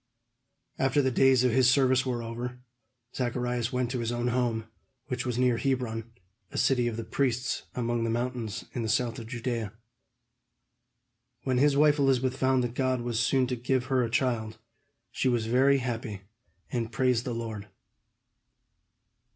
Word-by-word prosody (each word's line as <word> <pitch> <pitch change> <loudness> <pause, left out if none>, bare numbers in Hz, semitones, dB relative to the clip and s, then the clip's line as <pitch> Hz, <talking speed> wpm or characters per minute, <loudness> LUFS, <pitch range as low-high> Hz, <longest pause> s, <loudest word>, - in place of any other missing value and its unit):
After 135 +2 +2
the 130 -2 +2
days 130 0 +4
of 125 - +3
his 125 +1 +4
service 130 0 +3
were 120 -2 -2
over, 120 +2 -5 0.6
Zacharias 125 -1 -1
went 125 -1 -1
to 125 - -2
his 115 0 -1
own 120 0 -1
home, 120 -2 0 0.4
which 125 0 -2
was 120 -2 -1
near 125 -2 +3
Hebron, 120 -4 -2 0.4
a - - -6
city 125 -3 +2
of 115 -2 -3
the 115 - -3
priests, 125 -1 -1
among 120 -1 -1
the 115 - 0
mountains 115 -2 -3
in 120 - -2
the 110 - -2
south 115 0 0
of 115 - -8
Judea. 120 -4 -3 1.7
When 130 -2 +1
his 140 0 +4
wife 150 0 +4
Elizabeth 130 -2 +2
found 130 -1 +2
that 120 -1 -3
God 130 -1 0
was 120 -2 -2
soon 130 +1 +3
to 125 0 -2
give 125 +1 0
her 130 -2 +2
a 115 - -1
child, 115 -3 -1 0.5
she 130 - 0
was 120 -3 +1
very 130 +4 +4
happy, 115 -5 -4 0.5
and 115 -2 -2
praised 125 -1 +1
the 120 -2 -3
Lord. 110 -3 -5
125 Hz, 165 wpm, -28 LUFS, 115-130 Hz, 1.7 s, days